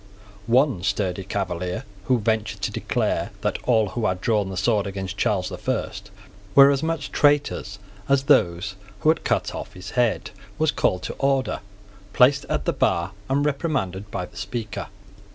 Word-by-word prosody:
One 125 -4 +3
sturdy 95 -2 -1
Cavalier, 90 -2 -3 0.2
who 130 - +3
ventured 110 -1 -1
to - - 0
declare - - -1
that - - -1
all 110 -4 +3
who 110 0 -1
had 90 -2 -1
drawn 105 -1 +1
the 95 - -5
sword 105 +1 +2
against 95 0 -4
Charles 95 -2 0
the 90 -2 -7
First 110 -4 -3 0.5
were 140 0 +9
as 140 -1 0
much 160 -3 -2
traitors 145 -8 +2 0.3
as 135 -1 +4
those 95 - +3 0.3
who 155 - +5
kind 165 - -14
cut - - 0
off - - -7
his 90 - -9
head, 120 -3 +1 0.3
was 155 -1 +2
called 90 0 0
to - - -4
order, 135 -1 +1 0.5
placed 140 +2 +5
at - - -2
the - - +1
bar, 85 +3 +1 0.2
and 140 +2 +2
reprimanded 135 - -1
by 90 -2 -3
the - - -15
Speaker. 115 -4 -4
110 Hz, 170 wpm, -24 LUFS, 95-135 Hz, 0.5 s, were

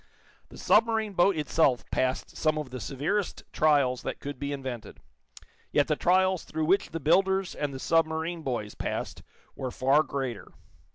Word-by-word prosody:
The - - -13
submarine 220 -1 +2
boat 175 0 +3
itself 150 -5 +2
passed 130 0 -1
some 155 -1 +1
of 150 -4 -5
the 130 - -5
severest 150 - -2
trials 140 -5 +3
that - - -5
could 140 -2 -7
be 140 0 -3
invented, 130 -6 -6 0.7
yet - - +3
the - - +1
trials 185 0 +2
through 160 -1 -3
which 190 +5 +2
the 165 - -4
builders 190 +4 +2
and 145 -1 -3
the 135 - -6
submarine 165 +3 0
boys 120 -7 -3
passed - - -4 0.3
were 130 - -4
far 135 +4 +3
greater. 135 -8 -5
155 Hz, 160 wpm, -28 LUFS, 130-175 Hz, 0.7 s, boat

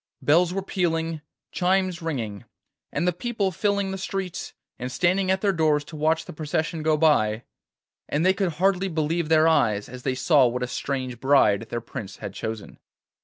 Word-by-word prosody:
Bells 170 +4 +3
were 195 +1 -2
pealing, 165 -4 -1 0.3
chimes 185 -1 +1
ringing, 115 - -4 0.5
and 160 +5 -1
the 180 - +2
people 205 0 -1
filling 200 +1 0
the 190 - -4
streets 190 -2 -4 0.3
and 125 +1 -4
standing 185 +7 +1
at 190 0 +2
their 200 -2 +2
doors 155 -3 +2
to 155 +2 -11
watch 160 +2 +1
the - - -9
procession 155 +2 -2
go 155 0 +2
by, 120 -8 +3 0.7
and 150 +4 0
they 190 - +5
could 190 -4 -1
hardly 190 +3 +1
believe 160 -1 -1
their 160 0 +5
eyes 110 -10 +2
as 125 0 -9
they 130 0 -1
saw 135 0 +4
what 125 +1 -2
a - - -1
strange 130 -1 -3
bride 115 -6 +3
their 120 - -3
Prince 105 -3 -8
had 100 - -7
chosen. 110 -1 -6
160 Hz, 180 wpm, -25 LUFS, 130-185 Hz, 0.7 s, they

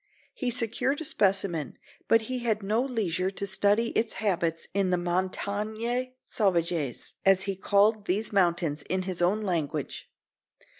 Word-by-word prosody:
He 255 - -2
secured 250 +4 0
a 320 - -4
specimen, 190 - 0 0.3
but 225 -1 +4
he 255 +3 -3
had 220 -3 -1
no 215 +4 +1
leisure 200 -8 -1
to 200 +1 -4
study 205 +4 +3
its 225 -1 0
habits 175 -5 -1
in 195 -1 +1
the 180 - +2
"montagnes 210 +7 -2
sauvages," 170 - -1
as 195 -1 +4
he 195 -1 -2
called 205 +2 +2
these 210 +4 0
mountains 170 -5 +1
in 185 0 0
his 185 -2 -3
own 200 +5 +2
language. 170 -7 -3
200 Hz, 145 wpm, -28 LUFS, 180-220 Hz, 0.3 s, but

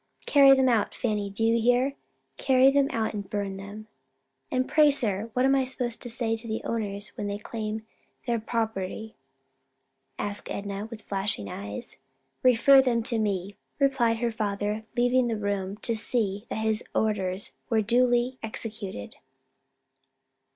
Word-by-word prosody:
Carry 275 -2 +7
them 265 -1 +3
out, 230 -4 +1
Fanny, 210 -4 -1
do 200 +3 -1
you 230 0 +3
hear? 245 +4 +3 0.4
carry 265 0 +5
them 280 0 +3
out 220 -1 -1
and 200 -2 -5
burn 200 -2 -2
them." 205 +2 -9 0.6
"And 255 0 0
pray, 305 -1 +5
sir, 225 -6 0
what 255 +2 +2
am 270 - +4
I 270 -1 +3
to 255 -2 -2 0.2
say 225 -1 -1
to 225 +1 -5
the 220 0 -3
owners 205 -3 -3
when 205 - -5
they 200 0 -2
claim 215 0 -5 0.4
their 235 -2 0
property?" 220 -2 -3 1.0
asked 205 0 -4
Enna 200 +1 -4
with 225 -2 -9
flashing 195 - -2
eyes. 100 +1 -7 0.4
"Refer 255 +2 +6
them 240 -3 +1
to 230 0 0
me," 200 -2 -2 0.2
replied 265 -5 +2
her 235 0 0
father 210 0 -2
leaving 245 +1 +3
the 225 -2 -1
room 200 -1 -2
to 230 - +1
see 215 -1 -1
that 220 - -2
his 220 +1 +1
orders 195 -3 -1 0.2
were 220 -2 +2
duly 245 +2 +2
executed. 215 - -5
220 Hz, 150 wpm, -27 LUFS, 205-245 Hz, 1.0 s, Carry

